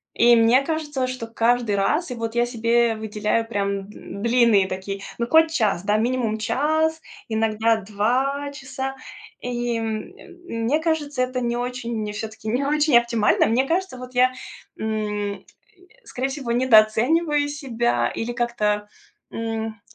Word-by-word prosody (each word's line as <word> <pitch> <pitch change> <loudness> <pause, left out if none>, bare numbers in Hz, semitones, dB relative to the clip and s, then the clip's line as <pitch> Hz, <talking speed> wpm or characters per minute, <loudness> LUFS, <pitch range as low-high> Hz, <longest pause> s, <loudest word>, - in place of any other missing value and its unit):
и 240 +1 +6
мне 235 +4 +5
кажется, 295 -3 -2
что 255 -3 -5
каждый 230 -1 +1
раз 300 - +1
и 250 - -4
вот 230 -1 -4
я 240 0 +2
себе 235 -1 +2
выделяю 215 +1 -1
прям 205 -3 -1 0.2
н 200 -1 -9
длинные 235 -5 +4
такие 190 +1 -5 0.2
ну, 235 - 0
хоть 320 +3 +5
час, 210 - +1
да, 205 +1 +2
минимум 230 -1 0
час, 315 +7 0 0.3
иногда 220 0 +1
2 255 +8 -1
часа. 270 -1 -5 0.5
И, 240 -1 -2
м, 220 -1 -3 0.4
мь 230 -6 -4
мне 275 +7 +2
кажется, 305 -4 -1
это 255 0 -1
не 240 -1 -1
очень, 245 -1 -3
мне 210 -1 -3
всё-таки, 220 +1 -7
не 245 +5 0
очень 295 -2 +4
оптимально. 235 -3 +2
Мне 245 +4 +2
кажется, 365 -2 -1
вот 255 0 -10
я, 255 +1 +5 0.5
м, 210 -2 -3 0.6
скорее 260 -7 -3
всего, 270 -3 -4
недооцениваю 260 +6 +3
себя 245 -5 0
или 230 +1 -4
как-то, 215 -4 -1 0.4
м, 225 -1 -4
235 Hz, 145 wpm, -23 LUFS, 220-265 Hz, 0.6 s, и